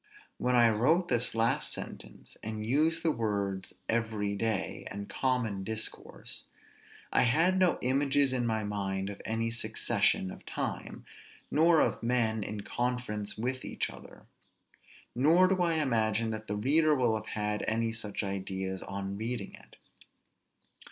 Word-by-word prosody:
When 125 0 +2
I 120 -1 +7
wrote 155 - +2
this 120 -2 +2
last 115 0 +2
sentence, - - -7
and 110 0 -4
used 155 +7 +2
the 165 - +3
words 100 -6 -2
every 110 -3 0
day 110 -2 -2
and 100 0 -6
common 110 -2 -1
discourse, 110 +2 -3 0.7
I - - +5
had 165 +10 +3
no 185 -2 +4
images 135 +1 +3
in 120 -2 0
my 110 -1 0
mind 100 -1 -2
of 100 - -9
any 115 +1 -1
succession 105 -5 +1
of - - -11
time; - - -4 0.5
nor 160 +1 +5
of - - +1
men 115 -3 +1
in 105 +1 -5
conference 120 -3 -2
with 130 +3 -2
each - - -3
other; - - -13 0.9
nor 160 +9 +5
do 185 -1 +1
I 170 -2 +2
imagine 115 -6 +1
that 110 0 -5
the 105 - -2
reader 150 +8 +3
will 115 -5 +2
have 105 0 -2
any 115 +1 +1
such 110 -2 -3
ideas 95 -1 -3
on 100 0 -4
reading 115 -1 -4
it. - - -15
115 Hz, 145 wpm, -30 LUFS, 105-130 Hz, 0.9 s, I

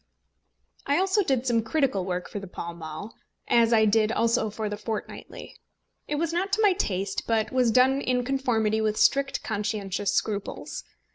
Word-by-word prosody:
I 285 - +3
also 385 +3 +2
did 265 -8 0
some 235 -3 +2
critical 235 - 0
work 180 -1 -3
for 205 - -6
the 195 - -9
Pall 170 -1 -6
Mall, 165 +5 -8 0.3
as 235 -1 +4
I 220 -2 +5
did 215 +1 +3
also 230 -1 +1
for 215 +1 -4
The 210 - -3
Fortnightly. 215 +1 -7 0.5
It 295 - -2
was 330 +2 -1
not 375 +3 -1
to 435 - +3
my 405 -3 +5
taste, 195 - -2
but 220 -2 +1
was 255 -2 +3
done 260 +4 +4
in 250 -2 0
conformity 230 -5 +1
with 215 -1 0
strict 275 0 +2
conscientious 205 -2 -2
scruples. 205 -2 -3
225 Hz, 170 wpm, -26 LUFS, 205-270 Hz, 0.5 s, I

